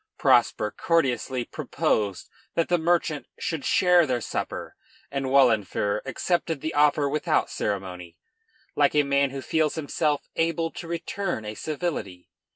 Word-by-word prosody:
] - - -57
Prosper 105 - +3
courteously 130 -6 0
proposed 100 -4 -1 0.3
that 165 - +1
the 175 -1 +3
merchant 160 -2 0
should 160 -5 -3
share 180 -3 +4
their 125 -2 0
supper, - - -4 0.4
and 135 -1 -2
Wahlenfer 110 -6 +2
accepted 165 +2 -1
the 160 - -3
offer 145 0 +3
without 150 +2 0
ceremony, 90 -4 -4 0.6
like - - +3
a 150 - +5
man 140 0 +2
who 135 0 -6
feels 155 -2 +1
himself 150 -1 -1
able 165 0 0
to 170 - -8
return 170 - -3
a 105 - -4
civility. 140 - -4
145 Hz, 140 wpm, -25 LUFS, 115-165 Hz, 0.6 s, a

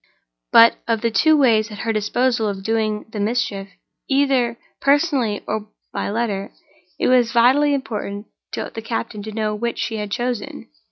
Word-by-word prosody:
But 230 0 +7
of 225 -2 0
the 230 - 0
two 310 +9 +4
ways 230 -6 +3
at 210 - -9
her 225 +2 -2
disposal 225 +2 +1
of 195 -1 -5
doing 215 -1 -1
the 215 - -5
mischief—either 235 +4 -1 0.2
personally 275 - +1
or 215 0 -4 0.2
by - - -2
letter—it 200 -4 -4
was 245 -2 +4
vitally 270 +5 +4
important 210 -6 -5 0.3
to - - -4
the 225 - -5
captain 225 -2 -4
to 215 +2 -7
know 215 0 -1
which 235 +2 -3
she 225 - -2
had 210 -1 -4
chosen. 240 - -4
225 Hz, 155 wpm, -21 LUFS, 210-245 Hz, 0.3 s, But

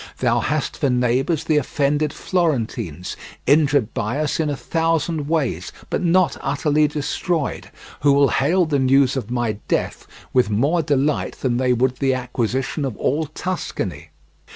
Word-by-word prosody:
Thou 120 -1 +2
hast 150 +5 -1
for 140 - +1
neighbours 125 +6 +1
the 155 -2 +2
offended 145 +1 0
Florentines, 120 - -2 0.3
injured 145 -4 +3
by 115 +2 -2
us 155 0 -1
in 155 -2 +1
a 145 - -1
thousand 165 -2 -1
ways, 155 -6 -1 0.2
but - - 0
not 175 0 +3
utterly 150 +2 +2
destroyed, 150 +2 -2 0.3
who 145 - +4
will 140 0 +4
hail 170 +7 +2
the 145 -3 0
news 135 0 +3
of 125 -6 -4
my 120 -4 -1
death - - -2 0.3
with 125 -5 +3
more 140 +11 +2
delight 145 0 0
than 120 -3 +1
they 130 0 +2
would 125 +1 +1
the 135 0 +1
acquisition 125 +3 -2
of 130 -6 -3
all 155 +3 0
Tuscany. 145 - -4
140 Hz, 155 wpm, -21 LUFS, 125-155 Hz, 0.3 s, who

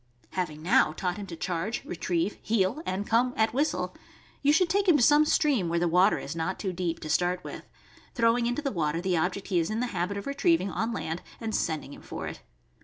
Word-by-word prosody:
Having 155 -5 -3
now 185 -4 +4
taught 180 +2 -2
him 205 -1 -6
to 170 - -7
charge, 180 +6 -3
retrieve, 175 +2 -2
heel, 220 +6 +1
and 190 +2 -2
come 245 +3 +2
at 220 +1 +2
whistle, 290 +5 0 0.5
you 285 - +4
should 340 +4 +4
take 395 +3 +1
him 340 -5 +6
to 250 - +3
some 295 +4 +6
stream, 275 - +2
where 170 - 0
the 175 +1 +2
water 180 +5 +4
is 140 - -6
not 165 +3 -2
too 190 -3 -3
deep, 170 -2 -2
to - - -6
start 175 +3 +1
with, - - -9 0.5
throwing 235 0 +3
into 245 +5 -2
the 275 - -1
water 165 -3 -1
the 180 0 0
object 180 +5 -1
he 180 -3 +2
is 165 - 0
in 215 +1 -2
the 250 - +1
habit 180 +3 -1
of 200 - -5
retrieving 280 - +1
on 225 +5 -1
land 165 -6 -3 0.2
and 225 -1 -4
sending 155 -6 -2
him - - -12
for - - -6
it. - - -7
195 Hz, 230 wpm, -28 LUFS, 175-245 Hz, 0.5 s, him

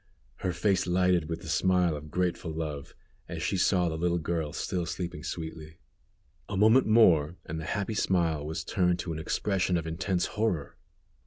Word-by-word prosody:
Her 90 - -2
face 90 +2 +1
lighted 90 -2 +2
with 80 - -4
the - - -8
smile 90 -3 +2
of 75 +1 -8
grateful 90 +1 -1
love, 75 -3 -5 0.3
as - - -4
she - - 0
saw 90 -1 +3
the 80 - -2
little 85 0 +1
girl 80 -2 -2
still 85 +2 -2
sleeping 85 -4 -5
sweetly. 80 -2 -6 0.7
A 100 - -2
moment 110 +6 +5
more 85 -8 +5
and 80 +1 -5
the 80 - -6
happy 105 +4 -2
smile 85 -7 +1
was 80 +2 -4
turned 90 0 +1
to 80 0 -4
an 80 - -5
expression 95 +2 0
of 80 - -3
intense 85 +3 -1
horror. 105 -9 -2
85 Hz, 175 wpm, -29 LUFS, 80-95 Hz, 0.7 s, moment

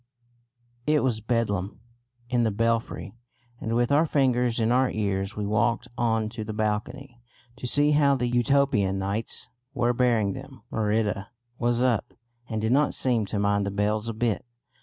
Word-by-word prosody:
It 150 0 +3
was 120 -4 0
bedlam 105 -4 -1 0.5
in 120 -1 +1
the 115 - +2
belfry, 115 +2 -1 0.5
and 115 +1 -2
with 120 +2 +1
our 155 +3 +4
fingers 125 -5 +2
in 115 +1 +2
our 130 +1 +3
ears 100 -1 -2
we 105 - -3
walked 115 +4 +1
on 115 -2 +1
to 110 0 -6
the 110 0 -6
balcony 120 +4 -3 0.4
to 125 - -5
see 145 +4 +3
how 145 -2 +4
the 125 -2 -1
Utopianites 110 -5 0 0.3
were 120 +1 +2
bearing 115 -5 +2
them. 135 -3 -10
Merida 105 -2 0 0.3
was 120 +1 +1
up, 120 -2 0 0.3
and 110 -2 -2
did 110 +2 0
not 145 +3 +3
seem 120 -5 +1
to 105 - -3
mind 100 0 +2
the 100 - -1
bells 105 +2 0
a 115 - -2
bit. 115 -2 0
115 Hz, 160 wpm, -26 LUFS, 105-125 Hz, 0.5 s, our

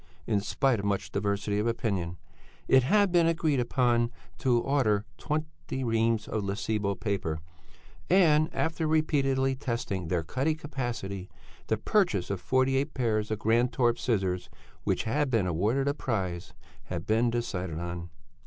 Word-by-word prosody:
In 105 -3 +1
spite 130 +2 +1
of 100 - -4
much 100 -1 -1
diversity 100 +1 -1
of 105 - 0
opinion, 95 -7 -1 0.5
it 130 - +6
had 200 +8 +3
been 170 -2 +4
agreed 155 -6 +2
to 120 0 +1
order 115 -6 +1
twenty 155 -3 -3
reams 115 -2 +1
of 110 - -2
Lessebo 100 0 -1
paper, 95 -8 -2 0.7
and 160 -4 +5
after 160 0 -1
repeatedly 135 -4 +2
testing 115 - -3
their 85 0 0
cutting 135 - 0
capacity, 120 - -4 0.4
the 110 - +1
purchase 110 - +1
of 100 - -3
forty 130 +1 +2
eight 135 - -1
pairs 110 -4 0
of 110 - -1
Grantorp 120 +2 +2
scissors, 95 -7 -1 0.4
which - - +1
had 140 +5 0
been 115 -6 +2
awarded 105 - +1
a 140 - +2
prize, 95 - -3 0.3
had - - -4
been 115 +2 +2
decided 95 -8 -3
on. 85 0 -5
115 Hz, 145 wpm, -29 LUFS, 100-135 Hz, 0.7 s, it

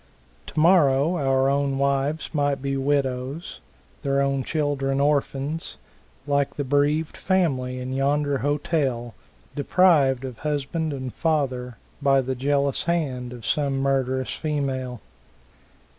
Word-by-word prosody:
Tomorrow 155 -2 +4
our 135 -2 +2
own 140 0 +1
wives 140 +4 0
might 145 -2 +1
be 135 +1 -2
widows, 135 +2 -1 0.4
their 140 -2 +1
own 135 -1 +1
children 140 -2 -1
orphans, 145 +2 0 0.5
like 140 -1 0
the 145 - -2
bereaved 145 +3 +1
family 135 -10 0
in 130 +1 -4
yonder 140 +1 +1
hotel, 140 -5 -1 0.4
deprived 145 -4 +3
of 125 -4 -7
husband 150 +2 -2
and 130 -3 -5
father 130 -7 -1 0.2
by 135 -1 +4
the 130 0 -1
jealous 140 +1 0
hand 135 -8 -1
of 120 -3 -9
some 140 +3 0
murderous 130 -1 0
female. 135 -5 -3
140 Hz, 115 wpm, -24 LUFS, 130-145 Hz, 0.5 s, Tomorrow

